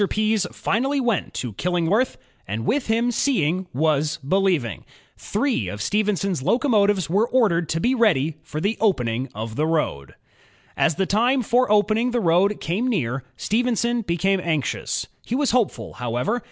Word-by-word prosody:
Pease 215 -3 +1
finally 270 +4 0
went 240 -6 -1
to 120 -4 -4
Killingworth 180 - 0 0.3
and 110 +4 -3
with 270 - 0
him 230 +2 +1
seeing 185 - 0
was 150 +1 +1
believing. 175 - +1 0.3
Three 215 - -1
of 105 +3 -6
Stephenson^s 195 - 0
locomotives 205 - +2
were 200 +7 +2
ordered 180 -10 +2
to 165 - 0
be 245 +9 +2
ready 165 - +2
for 155 - -6
the 205 +6 -1
opening 125 - 0
of 110 +1 -5
the 155 +4 0
road. 150 - -1
• - - -18 0.6
As 160 - +2
the 190 - 0
time 240 +7 +2
for 245 +1 +2
opening 215 +3 +3
the 240 -1 0
road 190 +2 +2
came 195 +10 -1
near, 135 - -1
Stephenson 235 +1 0
became 190 0 0
anxious. 155 -6 -2 0.2
He 240 - -3
was 285 0 +1
hopeful, 240 -4 0
however. 125 - -2
195 Hz, 155 wpm, -23 LUFS, 155-230 Hz, 0.6 s, opening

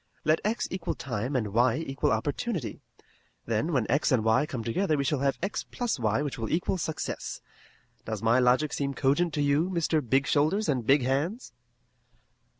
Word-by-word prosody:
Let 155 +1 +3
x 220 +3 -1
equal 185 -2 -3
time 125 +1 -3
and 110 -5 0
y 120 +1 +3
equal 135 -4 -1
opportunity. 145 - -2 0.6
Then 115 +9 0
when 130 -7 +1
x 145 +2 +1
and 125 -4 +3
y 110 +7 +3
come 125 -6 -4
together 155 - 0
we 140 - 0
shall 140 0 0
have 140 0 +1
x 195 - -2
plus 240 - -3
y 110 +4 +1
which 145 -4 -4
will 110 - -3
equal 180 +3 0
success. 160 -1 -4 0.7
Does 110 -1 -4
my 115 +3 +4
logic 130 +4 +3
seem 140 -1 -2
cogent 145 +7 +2
to 145 - +1
you, 145 +5 +2
Mr. 165 -3 +1
Big 135 +2 +1
Shoulders 155 +10 +2
and 125 -6 -1
Big 140 -1 +5
Hands?" 150 - -1
140 Hz, 180 wpm, -28 LUFS, 125-160 Hz, 0.7 s, Big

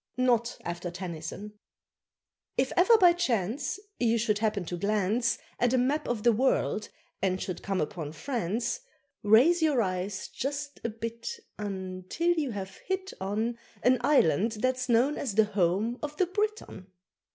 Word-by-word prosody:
_ - - -65 0.2
(NOT 235 -2 +2
AFTER 175 +1 -4
TENNYSON.) 180 +4 -7 1.0
If 260 +1 +1
ever 415 +6 +6
by 355 -4 +7
chance 260 - -1 0.2
You 235 -1 +3
should 215 -2 +1
happen 210 -4 0
to 175 - -4
glance 210 +4 +1 0.2
At 245 +1 +3
a - - +3
map 280 +5 +1
of 230 -3 -2
the 240 - +6
world, 225 -2 +1 0.3
and 185 -1 +1
should 185 -2 -4
come 195 -1 -1
upon 155 -1 -3
France, 230 - -2 0.4
Raise 255 +12 +5
your 300 -5 +3
eyes 190 -1 -2
just 285 +2 -4
a 235 - 0
bit, 230 - -5 0.3
un 190 -3 -5
Till 340 +1 +1
you 310 -5 -1
have 195 -4 -6
hit 380 0 -4
on, 220 +5 -1 0.2
An 255 +1 +4
Island 220 - +3
that's 255 +3 -1
known 245 +6 +3
as 235 -8 -3
the 220 0 +6
home 205 +4 0
of 300 0 -5
the 370 - +3
Briton. 415 - -3
230 Hz, 160 wpm, -29 LUFS, 195-270 Hz, 1.0 s, by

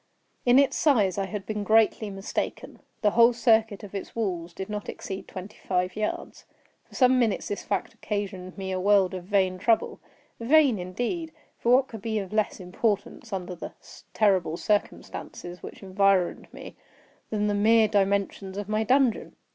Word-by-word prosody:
In 245 +1 +6
its 280 0 +4
size 205 - +3
I 195 - -1
had 205 -1 -5
been 210 0 -3
greatly 220 0 +3
mistaken. 195 0 -4 0.2
The 210 - +4
whole 235 +2 +6
circuit 225 -3 +2
of 205 - -10
its 195 - -6
walls 180 -7 -2
did 190 +3 -6
not 210 -1 -5
exceed 190 0 -6
twenty 190 +3 -9
five 180 -1 0
yards. 215 0 -4 0.4
For - - -16
some 255 -1 +4
minutes 225 -5 0
this 205 - -3
fact 200 - -3
occasioned 195 -3 -5
me 190 -1 -4
a 185 - -1
world 195 -1 +3
of 180 -1 -6
vain 190 -2 +1
trouble; 225 +2 +1 0.4
vain 265 -2 +4
indeed! 245 - -3 0.3
for 235 - +1
what 265 +1 +3
could 220 -3 -9
be 220 0 -2
of 195 -1 -4
less 215 -1 0
importance, 205 +4 -2
under 185 -2 -4
the 175 - -8 0.4
terrible 190 -6 +2
circumstances 180 -3 -3
which - - -10
environed 195 -1 +1
me, - - -10 0.5
then 210 -1 -1
the 205 - +1
mere 220 +2 +4
dimensions 200 -1 0
of 205 -1 -4
my 215 +1 0
dungeon? 255 0 +2
205 Hz, 170 wpm, -26 LUFS, 190-225 Hz, 0.5 s, In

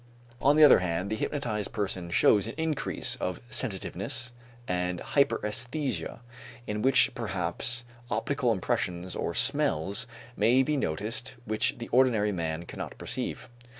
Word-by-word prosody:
On 145 +2 +5
the 155 - +8
other 145 - +9
hand, 90 +2 -2
the - - +1
hypnotized 110 -5 -3
person 95 -5 -2
shows 100 +4 +4
an 115 - -6
increase 160 -2 -1
of - - -3
sensitiveness 120 +2 -1 0.3
and 90 0 -1
hyperæsthesia 130 +1 0 0.4
in 105 0 -3
which 130 +2 +5
perhaps 115 +2 -2 0.2
optical 140 -4 0
impressions 90 -2 -2
or 85 - -3
smells 125 - +1 0.3
may 120 +5 +4
be 150 +3 0
noticed 115 - -2
which 110 0 +1
the 120 - -6
ordinary 115 -5 +3
man 85 -2 -3
cannot - - -7
perceive. - - -4
110 Hz, 130 wpm, -28 LUFS, 95-130 Hz, 0.4 s, other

